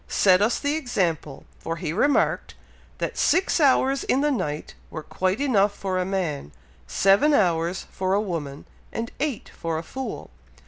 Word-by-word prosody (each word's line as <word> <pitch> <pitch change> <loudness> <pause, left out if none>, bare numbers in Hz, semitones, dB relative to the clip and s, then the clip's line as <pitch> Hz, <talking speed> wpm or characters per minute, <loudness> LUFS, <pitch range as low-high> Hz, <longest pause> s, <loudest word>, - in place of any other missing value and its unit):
set 185 -1 +4
us 220 +3 +2
the 285 0 -1
example, 180 - -2 0.2
for 165 - -4
he 165 -2 -4
remarked, 285 +9 +1 0.4
that - - -3
six 370 -1 +2
hours 270 -2 +3
in 265 - +2
the 295 0 +2
night 155 - -3 0.2
were 155 - -7
quite 185 - -1
enough 210 -8 +2
for 185 -2 -2
a 180 - 0
man 175 - -3 0.4
seven 200 +10 +4
hours 175 -3 +1
for 190 0 0
a - - +3
woman, 160 -9 -4 0.3
and 230 +1 -4
eight 285 -5 -3
for 165 -1 -3
a 160 - -4
fool. 260 - -6
195 Hz, 165 wpm, -24 LUFS, 165-260 Hz, 0.4 s, set